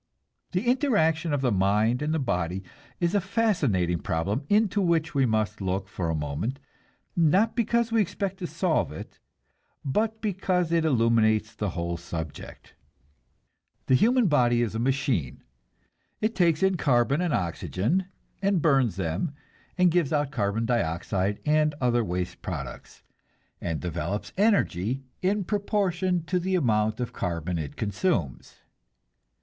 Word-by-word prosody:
The 180 +6 0
interaction 190 - +2
of 145 -2 0
the 125 -3 +2
mind 105 +5 +2
and 150 +1 -1
the 160 - +1
body 90 - -1 0.4
is 175 +1 +1
a 205 - +3
fascinating 145 - +1
problem 100 - -2
into 205 -1 +3
which 165 -3 +1
we 135 -3 +3
must 110 -2 -1
look 95 0 -2
for 90 -3 -3
a 80 - 0
moment, 75 - -3 0.6
not 185 +7 +3
because 235 0 +1
we 225 -1 +3
expect 195 0 -2
to 180 - -4
solve 165 - 0
it, 75 - -10 0.7
but 220 +10 0
because 185 -4 0
it 165 -1 +2
illuminates 115 -5 +2
the 105 - -2
whole 85 0 -2
subject. 80 -2 -8 1.1
The - - +2
human 240 - +4
body 120 -7 +3
is 115 - -2
a 110 - -2
machine. 130 - -1 0.8
It 215 +1 0
takes 170 -4 +2
in 190 -1 +3
carbon 135 +1 +2
and 175 -2 0
oxygen, 110 - -1 0.4
and 200 -2 +2
burns 135 - +3
them, 95 - -2 0.4
and 180 -1 +4
gives 170 -4 +1
out 145 -2 0
carbon 110 -2 -1
dioxide 100 -2 -1
and 150 0 +2
other 120 -2 +2
waste 90 -2 -4
products, - - -7 0.6
and 80 -3 -2
develops 90 +3 -4
energy 135 - +1 0.2
in 200 +2 +1
proportion 185 -3 0
to 180 +2 0
the 185 +2 -1
amount 110 -8 +1
of 125 - -3
carbon 85 -2 -2
it 75 -3 -5
consumes. 105 - -2
135 Hz, 145 wpm, -26 LUFS, -, 1.1 s, human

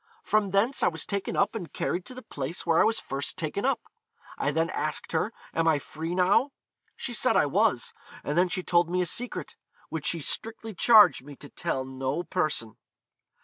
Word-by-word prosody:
From 215 -2 +2
thence 205 +8 +2
I - - +4
was 160 -2 -1
taken 200 -2 -3
up 200 - +2
and 195 -7 -6
carried 180 +1 -2
to 255 - -7
the 255 - -9
place 140 +4 -5
where 165 -1 +4
I - - +6
was 225 +1 +2
first 135 +1 -2
taken 170 +7 -2
up. 255 -4 +1 0.5
I 140 - -1
then 165 +3 0
asked 155 -4 -2
her, 165 +7 0 0.2
Am 165 0 +1
I 160 -2 +4
free 160 +4 -5
now? 200 +10 +3 0.4
She - - -4
said - - +2
I - - +4
was; 470 -1 +1 0.3
and 145 - -2
then 180 +1 +3
she 185 +1 -1
told 175 -1 +2
me 180 +1 +1
a - - -2
secret, 245 +7 -2 0.3
which 160 -3 -3
she 170 - +2
strictly 225 +7 -3
charged 210 - +6
me 145 +1 -11
to 145 - -12
tell 130 -1 -3
no 130 +5 -3
person.' 155 - -2
175 Hz, 200 wpm, -27 LUFS, 155-210 Hz, 0.5 s, I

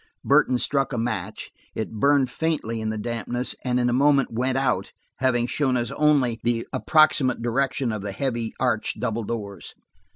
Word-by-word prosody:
Burton 125 - +4
struck 135 +2 0
a - - -2
match; 110 -3 -3 0.2
it 110 - -3
burned 140 0 +3
faintly 150 -9 -2
in 110 - -2
the 110 - -3
dampness, 120 +3 -2
and 125 -1 0
in 120 - +2
a 120 - +1
moment 140 +1 +3
went 130 +3 0
out, 135 -1 0 0.3
having 125 -2 +1
shown 130 0 0
us 120 -2 -2
only 140 -6 +2
the 115 0 0
approximate 155 -4 +3
location 130 +1 0
of 105 -2 -4
the 100 0 -4
heavy, 120 0 -2
arched 125 -4 0
double 115 -2 -2
doors. 100 -3 -6
125 Hz, 170 wpm, -24 LUFS, 115-135 Hz, 0.3 s, Burton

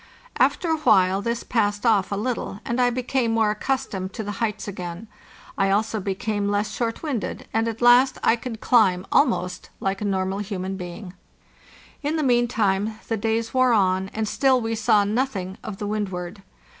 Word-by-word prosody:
After 345 - +2
a 320 - +2
while 195 -9 +3
this 235 +2 -2
passed 205 -2 0
off 210 -5 +3
a - - 0
little, 215 -2 -3
and 240 +2 0
I 245 - +4
became 250 0 -1
more 220 -2 +3
accustomed 210 -5 -3
to 220 - -4
the 205 - -4
heights 215 -3 -2
again. 180 +1 -6 0.5
I 195 0 +3
also 215 +2 +1
became 200 +1 -2
less 205 +1 0
short 230 +3 -3
winded, 275 -9 -3
and 225 +1 +1
at 230 +1 -4
last 245 +2 +6
I - - +4
could 230 -2 -7
climb 190 -6 +3
almost 180 -10 +1
like 195 +1 -2
a - - -1
normal 190 0 -1
human 195 -2 -4
being. 180 +1 -8 0.9
In 300 +2 -1
the 310 - 0
meantime 220 -5 +1
the 225 - +1
days 225 +1 -1
wore 255 -1 +4
on, 190 -2 +2
and 220 +1 -3
still 265 +3 +3
we 225 -1 -2
saw 215 -2 +3
nothing 205 -4 -2
of 205 -3 -6
the 205 - -4
Wendward. 195 -2 -4
215 Hz, 180 wpm, -23 LUFS, 195-235 Hz, 0.9 s, last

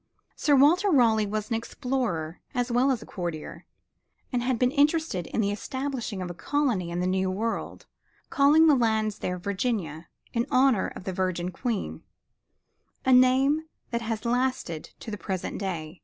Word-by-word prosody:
Sir 290 - +3
Walter 330 +9 +5
Raleigh 225 - +4
was 215 +1 -3
an - - +2
explorer 225 - -3
as 245 0 0
well 250 +3 +3
as 250 -4 0
a - - -12
courtier, 170 -5 -6 0.7
and 245 - +1
had 250 0 0
been 250 +1 +2
interested 295 - +1
in - - -1
the 200 -1 +1
establishing 245 -2 -4
of 180 - -5
a - - -6
colony 240 - 0
in 175 +1 -2
the - - 0
New 185 0 +1
World, 220 +5 -3 0.5
calling 300 +2 +5
the 310 - +6
lands 220 -4 +1
there 180 0 -2
"Virginia" 185 -5 -2 0.3
in 235 0 0
honor 255 -5 +3
of - - -9
the 190 - -4
virgin 180 -1 -1
Queen 225 +3 -3 1.0
a 260 - +5
name 265 +5 +4 0.3
that 235 0 -1
has 225 0 -3
lasted 245 -10 -1
to 225 - -7
the 210 - -5
present 190 -3 -4
day. 175 -4 -4
225 Hz, 170 wpm, -27 LUFS, 185-260 Hz, 1.0 s, the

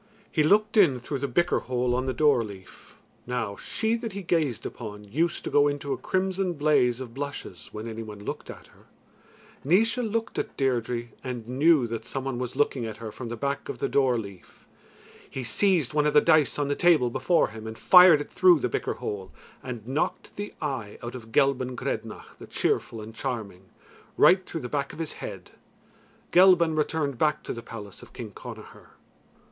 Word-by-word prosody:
He 155 - +2
looked 210 +8 +3
in 155 -11 +5
through 135 +3 -4
the 140 - -1
bicker 175 +8 +1
hole 125 -1 -1
on 130 +1 0
the 130 - 0
door 140 -2 +3
leaf. 100 -3 -12 0.3
Now 115 -5 -2
she 220 - -2
that 230 -3 -6
he 200 0 -5
gazed 155 - 0
upon 105 -3 -7
used 160 +12 -1
to - - -4
go 145 0 +5
into 145 -1 -2
a - - -3
crimson 190 -1 -1
blaze 145 -6 +2
of 125 -3 -7
blushes 135 - -7
when 110 +2 -6
any 115 0 -5
one 105 -2 -8
looked - - -5
at - - -10
her. - - -22 0.8
Naois 210 - +3
looked 225 -2 -2
at - - -5
Deirdre 120 -3 -1
and 120 -3 -5
knew 140 +2 +4
that 115 -1 -4
some 135 +3 -4
one 135 -2 -3
was 125 0 -4
looking 135 -3 +1
at 110 -1 -5
her 110 -1 -7
from 120 +2 -7
the 120 - -5
back 140 +4 -3
of - - -4
the - - -1
door 130 -3 +2
leaf. 100 -5 -10 0.6
He 130 - -5
seized 165 - +2
one 150 0 +2
of 150 - 0
the - - +10
dice 155 -3 +3
on 145 -1 0
the 145 - 0
table 160 -9 +4
before 160 +7 +2
him 110 0 -9
and 110 0 -7
fired 180 -4 +8
it - - -8
through 180 -4 +5
the 125 - -1
bicker - - -2
hole, 95 -2 -5 0.3
and 120 -4 -7
knocked 135 +4 -2
the 205 0 -5
eye 130 -9 -4
out 120 - -5
of 115 -3 -10
Gelban 130 0 +2
Grednach 115 -4 -5
the - - -11
Cheerful 115 - -1
and 110 +1 -9
Charming, 110 -7 -5 0.5
right 185 +1 +6
through 165 - -5
the 125 - -4
back 140 +1 -2
of - - -11
his 160 -2 -4
head. - - -7 0.8
Gelban 175 -3 +6
returned 150 -3 -1
back 150 -1 +1
to - - -4
the 115 - -7
palace 105 -4 -10
of - - -15
King - - -7
Connachar. - - -11
135 Hz, 200 wpm, -26 LUFS, 115-160 Hz, 0.8 s, the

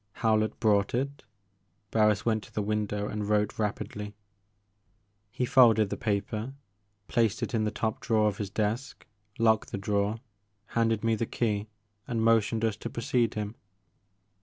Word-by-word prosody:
Howlett 110 -1 +1
brought 105 -2 +2
it. 140 +3 -3 0.7
Barris 105 -2 +3
went 110 -2 +1
to - - -17
the 105 - -2
window 105 0 -1
and 105 -1 -3
wrote 105 0 +1
rapidly. 105 0 -3 1.1
He 125 +4 -2
folded 115 -5 +5
the - - 0
paper, 110 +3 -2 0.5
placed 115 -2 +1
it - - -3
in 110 -2 +1
the - - +1
top 110 +1 -2
drawer 110 -2 +2
of 105 - -2
his 100 -2 -3
desk, 110 +6 -2 0.3
locked 110 -2 +2
the - - -2
drawer, 100 +2 0 0.5
handed 115 -2 +1
me 115 0 +2
the 110 +1 -1
key, 105 -3 -1 0.4
and 115 -2 -1
motioned 115 0 +3
us 110 -2 -1
to - - -5
precede 120 0 0
him. 105 0 -3
110 Hz, 155 wpm, -28 LUFS, 105-115 Hz, 1.1 s, folded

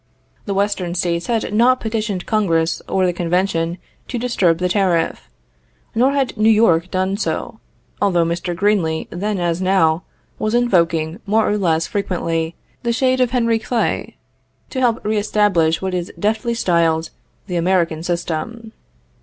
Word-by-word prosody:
The 200 -3 -2
Western 195 -3 -1
States 170 -1 -1
had 225 -3 -1
not 250 +4 +4
petitioned 215 -4 -3
Congress 165 -7 +1
or 190 -1 +2
the 180 - +1
convention 175 -1 0 0.3
to 250 - -3
disturb 210 -9 +1
the 180 +1 0
tariff; 180 -3 0 0.6
nor 255 +5 +3
had 275 -2 0
New 215 +1 +3
York 185 -6 +4
done 185 +2 -1
so, - - -3 0.4
although 180 -4 +3
Mr. 170 +1 -2
Greeley, 180 -4 +1
then 205 +4 -2
as 175 0 -1
now, 185 -3 +3 0.4
was 215 +2 0
invoking, 170 -7 +1
more 220 +2 +2
or 210 - +1
less 165 -5 +1
frequently, 165 -4 -2 0.3
the 235 - 0
shade 255 +1 +2
of 250 - +3
Henry 230 -2 +1
Clay 235 +1 -2 0.6
to 260 - -3
help 235 -4 +1
re 215 0 +1
establish 195 -6 +2
what 190 -1 -2
is 180 -1 -3
deftly 220 +5 0
styled 165 -6 +1 0.3
the 180 -3 -4
"American 170 -2 +1
System." 175 +6 -3
190 Hz, 150 wpm, -19 LUFS, 170-220 Hz, 0.6 s, not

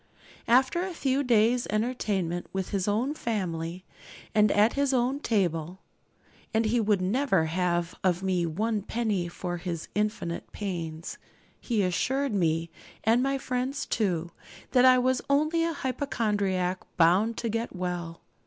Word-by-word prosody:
After 260 +8 +4
a 370 -1 -4
few 270 -2 +1
days' 240 0 +3
entertainment 210 -6 -1
with 190 -1 -3
his 195 -1 -1
own 230 +8 +1
family, 180 - -3 0.5
and 210 -1 +4
at 210 +3 +4
his 280 -1 +1
own 255 +3 +1
table 180 - -1 0.7
and 225 +1 +3
he 235 +3 +2
would 205 -4 +2
never 195 - +2
have 175 0 0
of 185 -1 +1
me 180 -3 +1
one 210 +6 -1
penny 210 -4 -1
for 175 +1 -4
his 170 -2 -5
infinite 210 -5 -2
pains 165 -5 -5 0.4
he 225 -5 0
assured 255 +9 0
me, 165 -3 0 0.3
and 230 +3 +4
my 275 +1 +1
friends 260 +1 -2
too, 175 -6 -1 0.4
that 255 0 +5
I 255 0 +7
was 255 +1 +2
only 310 +4 +2
a 335 - +1
hypochondriac 210 - -1 0.2
bound 190 +7 +4
to 235 - -2
get 230 -1 -3
well. 175 -2 -4
210 Hz, 145 wpm, -28 LUFS, 180-250 Hz, 0.7 s, I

